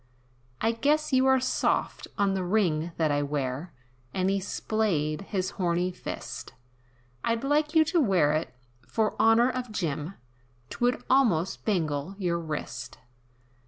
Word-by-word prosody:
"I 225 - +3
guess 290 +5 +1
you 260 0 +4
are 265 0 +5
soft, 255 0 0
on 200 -2 +2
the 190 -1 -1
ring 175 -4 +1
that 155 -2 +2
I 145 0 +1
wear," 145 +2 -3 0.4
And 185 +1 +1
he 195 - +1
'splayed 190 -6 -1
his 190 -2 -1
horney 175 +1 +1
fist, 180 - -7 0.7
"I'd 230 +1 0
like 300 +3 +1
you 315 0 +6
to 335 +1 +2
wear 180 - +3
it, 155 +2 -1 0.4
for 215 +10 0
honor 230 +3 +5
of 250 -2 -4
Jim, 165 -2 -3 0.6
'Twould 245 +1 0
almost 215 -10 +2
bangle 165 -3 -1
your 175 -4 0
wrist! 150 -5 -5
195 Hz, 140 wpm, -27 LUFS, 160-240 Hz, 0.7 s, you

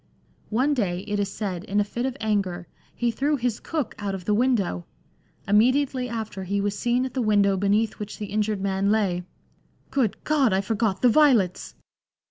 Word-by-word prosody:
One 260 +7 +2
day, 185 -9 -1
it 205 0 -3
is 200 -1 -1
said, 185 -5 -4
in 205 -1 0
a - - +4
fit 235 +5 -3
of 265 0 -5
anger, 195 -5 -1 0.3
he 240 -1 0
threw 285 +6 0
his 240 -4 -1
cook 305 -8 -3
out 200 -2 -2
of 180 -2 -8
the 210 - +1
window; 210 - +1 0.6
immediately 255 +5 +2
after 220 -4 -5
he 200 +2 -1
was 205 0 -1
seen 245 +4 +1
at 260 - -6
the 260 - -1
window 205 -3 +3
beneath 205 +3 +1
which 210 0 -6
the 210 - -4
injured 210 -1 0
man 195 0 0
lay: 195 -5 +1 0.4
" - - -38
Good 225 -6 +1
God 280 -8 +2
I - - +3
I - - +1
forgot 215 0 -1
the 250 - +7
violets." 235 - +3
215 Hz, 195 wpm, -25 LUFS, 200-245 Hz, 0.6 s, the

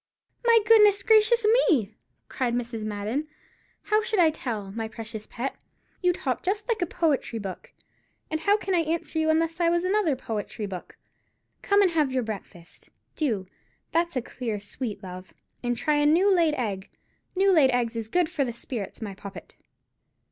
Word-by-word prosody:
"My 470 -1 +6
goodness 420 -3 +6
gracious 445 0 +4 0.2
me!" 225 - +2 0.3
cried 245 -2 -1
Mrs. 235 -2 -3
Madden, 215 +8 -3 0.6
"how 430 0 +2
should 435 -1 -2
I 330 -3 +5
tell, 220 -10 -5
my 225 +2 -4
precious 220 -1 -8
pet? 250 +3 -4 0.5
You 360 -1 +4
talk 260 -8 -2
just 410 +4 -2
like 455 -4 0
a 355 - +1
poetry 300 -8 0
book, 195 -4 -7 0.6
and 315 - 0
how 405 +6 +3
can 390 -2 -3
I 350 - +4
answer 325 0 -1
you 315 0 +1
unless 330 +1 +1
I 340 -1 +3
was 345 +1 +1
another 370 -5 +2
poetry 220 -3 -5
book? 185 -3 -8 0.6
Come 405 0 +4
and 370 - +3
have 305 -5 +1
your 255 -1 0
breakfast, 200 -5 -9 0.3
do, 225 - -1 0.5
that's 340 0 +1
a 255 - +1
dear 230 -3 -4
sweet 205 0 -5
love, 185 0 -9 0.3
and 245 -1 -1
try 300 +5 +1
a 295 0 +3
new 370 +6 +4
laid 330 -4 +3
egg. 200 -7 -3 0.5
New 390 +1 +4
laid 305 -7 +5
eggs 245 -2 0
is 225 -1 -3
good 355 +3 +2
for 290 - -1
the 240 -3 -3
spirits, 230 -2 -6
my 205 -2 -5
poppet." 200 0 -10
275 Hz, 175 wpm, -26 LUFS, 220-350 Hz, 0.6 s, My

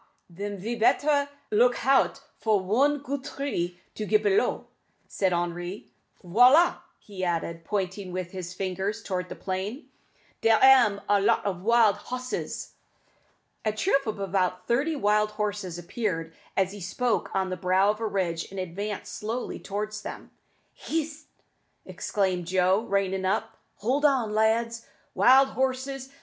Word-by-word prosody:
den 200 +3 -5
ve 215 +6 -4
better 285 +5 +2 0.2
look 240 +3 +4
hout 270 +1 +2 0.2
for 215 -2 +2
one 255 +10 +2
goot 280 -1 -4
tree 225 -12 -3
to 215 - -5
get 425 - +2
b'low," 415 0 +1 0.4
suggested 190 -2 0
Henri. 175 +2 -3 0.3
"Voilà!" 250 - +6 0.2
he 195 -3 -8
added, 170 -1 -2
pointing 190 0 -3
with 180 -1 -4
his 180 -2 -6
finger 190 +1 -2
towards 185 -4 -4
the - - -6
plain; 195 +9 -4 0.5
"dere 225 -1 +5
am 250 -7 +6
a 205 -1 +3
lot 200 - +2
of 185 -3 -2
wild 225 -1 +4
hosses." 255 0 -5 0.9
A 215 - +1
troop 275 - +1
of 215 -2 -3
about 185 -2 -1
thirty 280 +7 +1
wild 210 -3 +2
horses 205 -4 -3
appeared, 175 -3 -3 0.2
as 190 -1 +2
he 205 0 -9
spoke, 230 +7 -1
on 190 -1 0
the - - -1
brow 185 +3 +3
of 215 - -7
a 225 - -1
ridge, 180 -5 -2
and 195 - -7
advanced 195 +4 -5
slowly 230 +4 -4
towards 210 +1 -4
them. - - -8 0.4
"Hist!" 310 -1 -4 0.6
exclaimed 185 -4 -1
Joe, 185 +2 +3
reining 195 -2 0
up; 190 - -1 0.2
"hold 260 +7 -1
on, 255 -7 +2
lads. 230 +2 +1 0.3
Wild 265 +2 +6
horses! 265 0 -2
210 Hz, 145 wpm, -27 LUFS, 185-250 Hz, 0.9 s, Voilà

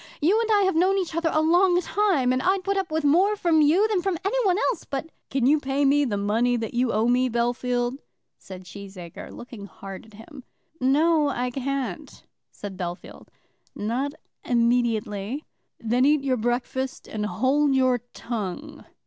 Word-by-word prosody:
You 390 +9 +3
and 450 - -2
I 410 -1 +4
have 380 - +2
known 375 +4 +3
each 365 -4 -2
other 335 -1 +1
a 310 - +2
long 350 +2 +4
time, 360 -10 +1
and 255 - 0
I'd 375 +3 +1
put 395 +1 0
up 385 -2 -1
with 315 0 -1
more 365 +9 +4
from 335 -5 +2
you 335 +9 +4
than 415 -5 0
from 380 -2 -1
anyone 400 -4 +2
else; - - -7
but 285 +3 -5
" - - -48
"Can 265 -3 0
you 300 +4 +4
pay 275 0 0
me 285 +1 +4
the 210 -6 -1
money 225 +5 +1
that 225 -2 -4
you 240 0 +1
owe 220 +2 +1
me, 250 +1 +2
Bellfield?" 245 +2 -1 0.4
said 185 -1 -10
Cheesacre, 185 -2 -10
looking 235 -4 -10
hard 195 +1 -10
at 220 - -17
him. 255 +5 -12 0.4
"No, 295 +3 +3
I 250 -2 -2
can't," 275 +1 -4 0.3
said 200 -2 -8
Bellfield; 175 -1 -7 0.5
"not 250 +7 -2 0.3
immediately." 235 0 0 0.3
"Then 240 +3 +1
eat 295 -1 +3
your 260 -2 +1
breakfast, 245 +3 -2
and 215 -1 -4
hold 265 +9 +2
your 255 -2 +3 0.2
tongue." 235 +7 -5
265 Hz, 175 wpm, -25 LUFS, 235-320 Hz, 0.5 s, I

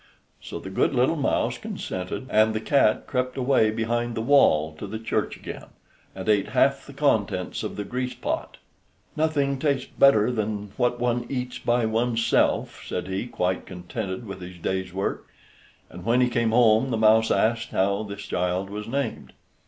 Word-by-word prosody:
So - - -7
the 95 +3 -8
good 115 - +1
little 130 +6 +3
mouse 145 -4 0
consented, 90 +7 -5
and 110 0 +4
the - - 0
cat 120 -2 +2
crept 125 -1 -2
away 130 -4 +3
behind 120 +2 -1
the 110 - -2
wall 80 - +4
to - - -5
the 110 - -5
church 110 - -2
again, - - -8 0.5
and 95 +1 -7
ate 105 -2 +3
half 140 0 +2
the 140 - -10
contents 110 -10 0
of - - -4
the 105 - -3
grease 125 +4 -3
pot. - - -4 0.6
"Nothing 145 -3 +1
tastes 140 -3 0
better 125 -4 +6
than 105 -3 -3
what 120 -1 0
one 120 0 0
eats 125 -2 -4
by 120 -1 +1
one's 115 +1 0
self," - - +1
said 95 - -4
he, 95 +5 -2
quite 90 -5 -2
contented 95 +4 -5
with 100 -2 -8
his 90 0 -9
day's 95 +1 -2
work; 95 +2 -3 0.6
and 90 +1 -11
when 120 +6 +2
he 125 -1 +3
came 115 -1 +1
home 115 +1 +4
the 115 - 0
mouse 110 +1 +4
asked 115 +1 +1
how 100 +2 +1
this 100 -1 -7
child 90 +2 -2
was 105 +1 -6
named. 135 -1 -3
110 Hz, 175 wpm, -25 LUFS, 100-125 Hz, 0.6 s, better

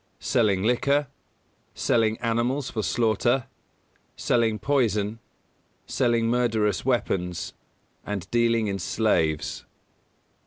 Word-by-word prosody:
Selling 100 -5 +1
liquor, 140 +5 +2 0.7
selling 110 -1 +1
animals 125 +4 0
for 110 - -2
slaughter, 120 +3 +1 0.7
selling 115 -3 +1
poison, 110 -5 0 0.7
selling 120 -3 +1
murderous 110 -5 +1
weapons, 90 -9 -1 0.5
and 100 -4 -4
dealing 115 -1 +2
in 100 -1 -2
slaves. 80 -7 0
115 Hz, 85 wpm, -25 LUFS, 105-120 Hz, 0.7 s, liquor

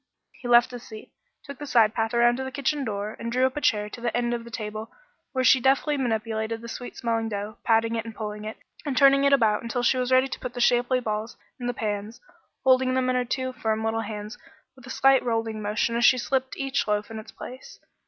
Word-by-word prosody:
He 245 - -9
left 240 +1 +5
his 245 -1 -7
seat, 220 -2 -11 0.3
took 280 -2 -10
the 290 - -6
side 225 -4 +4
path 225 +1 -1
around 240 +1 +4
to 265 - -3
the 265 - -5
kitchen 280 +1 -1
door, 210 -2 -4
and 230 0 -4
drew 255 +2 +3
up 260 - -1
a 295 - -3
chair 210 -7 +2
to 240 - -9
the 240 -1 -1
end 240 0 0
of 235 -1 -3
the - - -10
table 215 -1 -6 0.4
where 260 -1 0
she 260 +1 +6
deftly 275 +3 +2
manipulated 225 -3 -2
the 235 - -8
sweet 245 +1 -7
smelling 225 -1 -1
dough, 205 0 -5
patting 225 0 +2
it, 225 - -2
and 225 -1 -9
pulling 210 -1 -5
it, 215 +1 -6 0.3
and 280 -4 -3
turning 275 0 +6
it 280 - +4
about 225 -6 +3
until 240 +1 -3
she 255 - +3
was 250 0 -1
ready 260 +1 +5
to - - -6
put 250 -1 -6
the - - -4
shapely 245 +1 +3
balls 220 0 -4 0.2
in 245 - -4
the - - +1
pans, 210 0 -4 0.4
holding 260 0 +4
them 255 -1 +1
in - - 0
her 250 0 +1
two 260 +1 -2
firm 220 -2 -1
little 225 0 0
hands 210 +1 -7 0.4
with 255 -2 -15
a - - -9
slight 270 0 +4
rolling 225 -2 -2
motion 215 +3 -1
as 235 - +1
she 255 - +6
slipped 260 +1 -1
each 270 -2 -1
loaf 210 +1 -1
in 220 - -5
its 220 0 -11
place. 255 +1 -10
235 Hz, 245 wpm, -25 LUFS, 220-255 Hz, 0.4 s, she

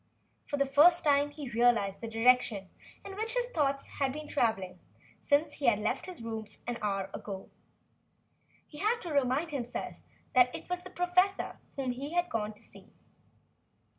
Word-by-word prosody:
For 290 - -2
the 275 - +3
first 310 +6 +6
time 285 -1 +3
he 290 -4 -8
realized 230 -4 +2
the 230 - -4
direction 225 -4 +3 0.4
in 390 - -7
which 450 +3 -2
his - - +2
thoughts 280 -3 +1
had 275 -2 +2
been 300 +2 -7
travelling 195 - 0 0.4
since 290 +1 +2
he 275 - -1
had 235 - +5
left 215 - -2
his 360 -10 -8
rooms 220 -2 -5
an 240 0 -3
hour 195 -2 -1
ago. 195 -2 -7 1.1
He 295 - -12
had 440 +4 +1
to 340 -4 -5
remind 280 +4 +1
himself 245 -4 -4 0.4
that 250 -1 +5
it - - -8
was 360 0 -1
the 370 - -10
professor 365 +2 +1 0.2
whom 265 -2 -1
he 275 +5 -5
had 350 0 +1
come 215 -2 -1
to 210 - -14
see. - - -14
275 Hz, 170 wpm, -31 LUFS, 225-315 Hz, 1.1 s, first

